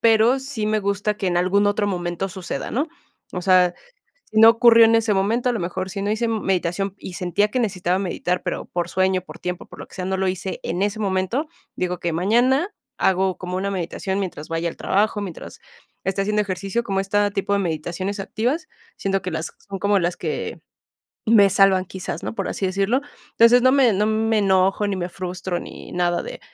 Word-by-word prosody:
pero, 230 +3 +4
sí 265 -5 -4
me 215 0 +1
gusta 200 +1 0
que 200 - -3
en 175 -1 +2
algún 195 +3 +2
otro 205 0 +1
momento 175 0 -2
suceda, 180 -6 -5
¿no? 285 +6 0 0.5
O 180 - -3
sea, 180 -1 +4 0.5
si 215 - +1
no 225 - +10
ocurrió 230 0 +7
en 225 0 +4
ese 225 -2 +2
momento, 225 +6 +1
a - - 0
lo 230 - -2
mejor 185 +2 -3
si 195 +1 -4
no 205 - -1
hice 220 +2 0
meditación 195 -3 -1
y 185 - -8
sentía 180 +4 +1
que 250 +4 -1
necesitaba 185 -4 0
meditar, 180 -1 -2
pero, - - -3
por 175 -1 -3
sueño, 185 0 +1
por - - -12
tiempo, 180 0 -5
por - - -14
lo - - -8
que - - -17
sea, 185 - -4
no 190 +1 -1
lo 190 0 0
hice 190 +1 -3
en 175 +3 -2
ese 205 +1 0
momento. 195 - 0 0.3
Digo, 180 -1 -2
que 170 -1 -1
mañana 245 - +2 0.3
hago 190 0 +2
como 180 0 -4
una 195 +1 -1
meditación 190 +1 -3
mientras 175 -6 -5
vaya 165 +1 -1
al - - -7
trabajo, 210 +2 +1
mientras 190 -5 -8 0.4
esté 195 +1 -1
haciendo 210 +1 +1
ejercicio, 195 +3 -2
como 195 -4 0
esta 205 +1 +1
tipo 200 0 -2
de 200 - +3
meditaciones 175 +4 -3
activas, 250 - -2 0.3
siento 195 0 -1
que 185 - -4
las 160 0 -4 0.2
son 195 -1 -4
como 200 +1 +2
las 175 0 -1
que - - -4 0.7
me 210 -3 +6
salvan 190 -1 +4
quizás, 190 0 -6
¿no?, - - -4
por - - -3
así 195 - -2
decirlo. 195 +7 +1 0.3
Entonces, 235 +2 +6
no 255 - +5
me 265 -4 +5
no 205 +2 +1
me 220 0 +1
enojo, 195 +1 +2
ni 200 - -1
me 175 -1 -3
frustro, 180 -1 -4
ni - - -10
nada 175 -1 0
de: - - -8
195 Hz, 210 wpm, -22 LUFS, 185-215 Hz, 0.7 s, no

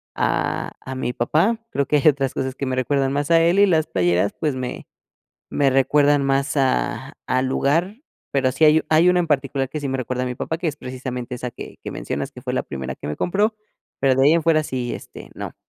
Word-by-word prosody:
a - - -1
a 130 - -7
mi 125 -1 -2
papá. 165 - +1
Creo 140 -1 0
que 150 - +3
hay 145 - +2
otras 135 -2 -1
cosas 130 0 -3
que 140 - -3
me 130 - -1
recuerdan 135 +1 +1
más 145 +3 -1
a 165 0 +6
él, 170 +3 +3
y 205 - +7
las 160 -3 +2
playeras, 90 +1 +1
pues, 150 -4 0
me 130 -1 -5 0.6
me 140 -2 +2
recuerdan 145 +2 +3
más 135 +1 0
a 130 -1 0
al 130 +1 +1
lugar. 165 +9 +1 0.4
Pero 135 -2 +2
sí 160 - +2
hay 155 +1 +5
hay 160 +3 +5
una 180 - +3
en 170 - -2
particular 135 -2 0
que 155 - -4
sí 140 - -3
me 135 - -1
recuerda 125 0 -2
a - - -3
mi 125 - -3
papá, 160 - -3
que 175 - -3
es 145 - -3
precisamente 125 -2 -6
esa 125 0 -5
que - - -9
que - - -4
mencionas - - -4
que - - -12
fue - - -3
la - - 0
primera 65 -1 -5
que - - -9
me 75 - -2
compró, 205 +5 +1 0.5
pero 135 -1 +3
de 135 - +4
ahí 150 - +6
en 170 - +2
fuera 155 -1 +3
sí, 125 -3 -3
este, - - -11
no. - - -7
135 Hz, 235 wpm, -22 LUFS, 130-155 Hz, 0.6 s, y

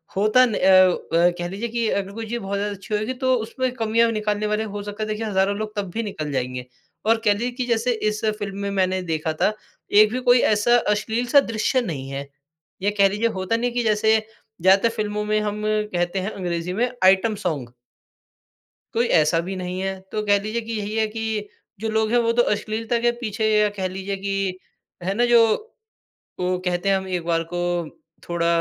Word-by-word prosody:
होता 215 +6 +5
न 230 - -2
अ - - 0
अ, 185 -2 +4
कह 175 - -2
लीजिए 200 +6 -4
कि 230 -1 -1
अगर 195 -1 -1
कोई 225 +1 -5
चीज़ 235 +2 -3
बहुत 200 0 -3
ज़्यादा 205 0 -2
अच्छी 195 +2 -8
होएगी 215 +4 -1
तो 260 - +4
उसमें 250 +2 -2
कमियाँ 230 0 +2
निकालने 215 -1 -1
वाले 210 +1 0
हो 205 - -4
सकता 205 +1 -5
है - - -3
देखिए 215 +1 -3
हजारों 200 -1 +1
लोग 215 0 -5
तब 200 -3 -3
भी 230 - -2
निकाल 155 -8 -4
जाएँगे। 125 -1 -3 0.4
और 225 +1 +4
कह 205 - +5
लीजिए 235 +5 -2
कि 250 0 -3
जैसे 235 0 +1 0.2
इस 210 +2 -5 0.2
फ़िल्म 200 -2 -5
में 200 0 -2
मैंने 185 -1 +1
देखा 160 -2 -2
था, 215 - +3 0.4
1 215 +1 +6
भी 250 - -1
कोई 245 - +7
ऐसा 230 +3 +4
अश्लील-सा 230 +6 +2
दृश्य 230 +1 0
नहीं 145 - -5
है 140 +1 -5 0.5
या 200 - +2
कह 200 - +6
लीजिए 210 +4 0
होता 190 0 -1
नहीं 245 +2 0
है - - -10
कि 240 - +2
जैसे, 220 0 +3 0.4
ज़्यादातर 195 +5 +5
फ़िल्मों 210 -1 -2
में 215 0 +1
हम 210 0 -3
कहते 195 -4 0
हैं 190 +3 -3
अंग्रेजी 175 -2 -3
में 240 +6 +1
आइटम 190 +4 +4
सॉन्ग। 140 -9 -2 1.2
कोई 235 +1 +2
ऐसा 155 +2 +2
भी 195 - -4
नहीं 180 0 -4
है। 190 0 -3
तो 215 - -1
कह 205 0 +4
लीजिए 215 +3 -2
कि 230 0 -7
यही 210 0 -3
है 220 0 +2
कि, 220 -1 -3 0.3
जो 225 - -2
लोग 220 0 +1
हैं 240 - +3
वो 230 -1 +2
तो 240 +1 +4
अश्लीलता 225 +3 -2
के 240 0 +3
पीछे 220 -2 -1
या 210 0 +4
कह 190 -1 0
लीजिए 195 +1 -4
कि, 195 -1 -2 0.4
है 190 +3 -1
ना? 240 +4 +2
जो 235 - +4 0.8
ओ, 180 0 0
कहते 180 +1 0
हैं 195 - +4
हम 190 - -5
एक 180 -3 -3
बार 165 -1 +1
को 175 - -1 0.7
थोड़ा 170 -1 0
210 Hz, 210 wpm, -23 LUFS, 190-225 Hz, 1.2 s, कोई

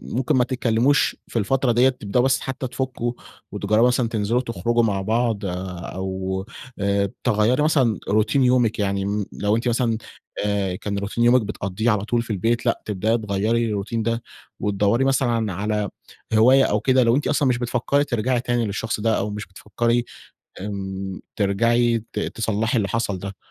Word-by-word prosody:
ممكن 135 +4 +1
ما 125 - +4
تتكلّموش 125 +2 +2
في 115 - -2
الفترة 130 +4 +1
ديّة، 125 +3 +5
تبدؤوا 125 -2 -1
بس 130 -2 +3
حتّى 130 0 -4
تفكّوا 125 -2 -3 0.4
وتجرّبوا 110 +4 +2
مثلًا 125 -1 +1
تنزلوا 115 +1 0
وتخرجوا 120 -1 0
مع 100 -3 0
بعض 115 +1 0
أو 95 +1 -4 0.3
آآ 100 0 +1
تغيّري 120 +3 +2
مثلًا 135 -9 +2
روتين 110 +6 +2
يومِك. 125 -4 +2
يعني 100 -1 0
م 100 0 -1
لو 105 +1 0
أنتِ 115 +2 -1
مثلًا 120 -1 +1 0.5
آآ 100 -3 0
كان 100 +2 -4
روتين 100 +4 -1
يومِك 120 +1 +5
بتقضّيه 100 +1 -2
على 105 -1 0
طول 120 +1 +1
في 115 - -10
البيت 115 +6 0
لأ، 115 - +1
تبدأي 110 +3 0
تغيّري 110 +2 0
الروتين 110 +1 -2
ده 115 +1 -1 0.4
وتدوّري 105 +5 +1
مثلًا 120 -6 +1
على 105 +2 -1 0.4
هواية 125 +5 +6
أو 105 - +1
كده 130 +2 +3
لو 115 0 +3
أنتِ 145 - 0
أصلًا 145 -2 +2
مش 125 -2 +2
بتفكّري 125 +4 0
ترجعي 125 -2 0
تاني 120 -1 0
للشخص 105 +2 -3
ده، 110 +1 +1
أو 105 - -2
مش 105 +1 -5
بتفكّري 115 +5 -1 0.6
آمم 95 -1 -5 0.2
ترجعي 115 +3 +2
ت - - -4
تصلّحي 110 +2 -1
اللي 105 -4 +1
حصل 110 -4 -1
ده. 100 +1 -7
115 Hz, 170 wpm, -22 LUFS, 100-120 Hz, 0.6 s, هواية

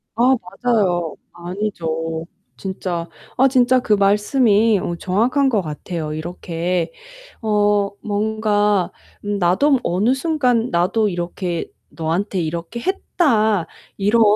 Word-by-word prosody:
아 250 +3 +4 0.3
맞아요. 185 -9 +1 0.2
아니죠. 165 -3 -3 0.3
진짜 180 -3 -4 0.3
아 265 - +6
진짜 255 -1 +4
그 215 - +1
말씀이 210 +1 +3
어 175 -1 -3
정확한 240 +11 +1
것 220 -6 +1
같아요. 155 0 -5
이렇게 170 +1 -3 0.5
어 205 -2 +2
뭔가 210 -2 +1 0.5
나도 245 +11 +3
어느 205 +8 +2
순간 260 -5 +1
'나도 185 +6 +2
이렇게 175 -1 -3 0.2
너한테 175 +4 -2
이렇게 170 +8 -4
했다.' 220 - +1 0.3
이런 210 +4 +3
205 Hz, 215 characters per minute, -20 LUFS, 175-230 Hz, 0.5 s, 아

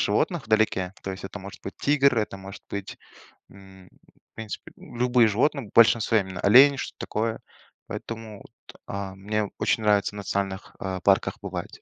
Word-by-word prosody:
животных 135 - 0
вдалеке. 110 -4 +1
То 95 - -4
есть 95 - -9
это 100 - -7
может 100 +1 -10
быть 95 - -7
тигр, 140 -3 +3
это 105 -2 -2
может 95 +1 -10
быть, 100 -1 -5 0.5
м, 95 -1 -16 0.5
в - - -70
принципе, 110 -2 -7
любые 120 -1 +2
животные, 130 +2 0
в - - -25
большинстве 115 -2 +5
именно 95 -2 -7
олени, 135 +7 +7
что-то - - -6
такое. 110 +1 -2 0.5
Поэтому 110 -3 -7
вот, - - -17
а, 100 -1 -5
мне 105 +1 -2
очень 110 - +1
нравится 105 -1 +2
в - - -7
национальных, 100 0 -3
а, 95 -1 -3
парках - - +2
бывать. - - -6
105 Hz, 170 wpm, -25 LUFS, 95-115 Hz, 0.5 s, олени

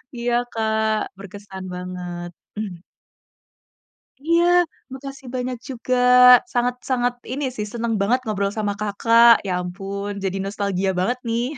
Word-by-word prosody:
Iya 240 0 -1 0.2
Kak, 220 -1 0
berkesan 195 -1 -10
banget. 180 -1 -6 0.3
Hmm. 190 -6 -5 1.4
Iya, 335 +1 +3 0.5
makasih 270 -1 -9
banyak 250 0 -3
juga, 255 0 -2 0.6
sangat 245 0 +1
sangat 245 -1 +1 0.2
ini 285 +2 -3
sih, 210 - -3
seneng 230 -1 -1
banget 240 +6 +2
ngobrol 200 -2 -1
sama 205 -1 0
Kakak. 230 +3 +5 0.2
Ya - - -1
ampun 195 +3 -5
jadi 195 0 -1
nostalgia 195 -1 -1
banget 245 +7 0
nih. 230 +1 0
215 Hz, 125 wpm, -22 LUFS, 195-245 Hz, 1.4 s, Kakak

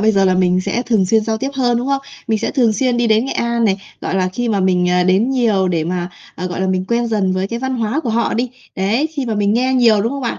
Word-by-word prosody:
bây 220 +1 +3
giờ 195 -1 +3
là 185 -1 +3
mình 185 0 +2
sẽ 240 +6 -2
thường 215 -7 +1
xuyên 220 +2 +2
giao 220 -1 -1
tiếp 270 +4 -3
hơn, 245 -3 +1
đúng 245 - -3
không? 275 0 0 0.3
Mình 220 -1 +1
sẽ 225 - -2
thường 240 -6 +2
xuyên 245 +3 0
đi 240 -1 +1
đến 220 +2 +3
Nghệ 270 - -3
An 235 0 0
này, 195 -3 +2 0.2
gọi - - -3
là, 185 -1 +1
khi 235 +6 -3
mà 200 -3 +1
mình, 180 -1 +2
ờ, 180 0 +2
đến 195 +8 +2
nhiều 215 -8 +1
để 165 -3 0
mà, 175 +1 -2 0.3
à, 180 - -4
gọi 180 +1 -4
là, 190 - 0
mình 185 0 0
quen 235 0 +1
dần 200 -4 0
với 185 +1 -1
cái 235 - -3
văn 260 0 -2
hóa 230 +5 -1
của 240 -8 -3
họ 230 +1 0
đi. 240 +1 -1 0.3
Đấy, 215 +11 +1
khi 290 -5 -5
mà 225 - -1
mình 205 0 +1
nghe 255 +3 +1
nhiều, 230 -4 +4
đúng 230 +5 -1
không 280 - -4
bạn? 235 - -3
220 Hz, 305 wpm, -17 LUFS, 190-240 Hz, 0.3 s, nhiều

